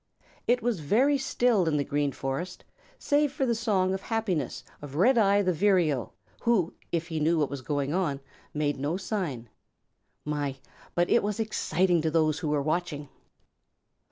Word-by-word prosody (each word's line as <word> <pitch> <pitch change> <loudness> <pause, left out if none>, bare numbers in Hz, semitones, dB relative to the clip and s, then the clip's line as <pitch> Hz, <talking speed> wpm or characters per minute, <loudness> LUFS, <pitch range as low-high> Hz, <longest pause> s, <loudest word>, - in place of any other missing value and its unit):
It 245 0 +2
was 235 -6 0
very 255 - +3
still 240 -8 +2
in 150 -2 +2
the 140 - +1
Green 145 0 0
Forest 135 +8 -4 0.3
save 290 -1 +2
for 270 -1 -1
the 240 - +2
song 200 -5 +1
of 190 - -3
happiness 190 - -2 0.2
of 145 -1 -8
Redeye 205 - +4
the 185 -1 +1
Vireo 170 - +2 0.3
who, 220 -8 +2 0.2
if 170 0 -2
he 160 -1 -2
knew 165 +3 +2
what 150 -3 0
was 140 -2 -5
going 145 +1 -2
on, 165 -7 0 0.3
made 145 -2 -1
no 145 +6 -1
sign. 180 - -3 0.8
My, 145 -2 -2 0.4
but 175 0 +2
it - - +5
was 210 +1 -2
exciting 185 -5 +1
to 160 - 0
those 155 -2 +2
who 160 - -3
were 145 -1 +1
watching! 155 -2 -2
170 Hz, 165 wpm, -28 LUFS, 145-210 Hz, 0.8 s, it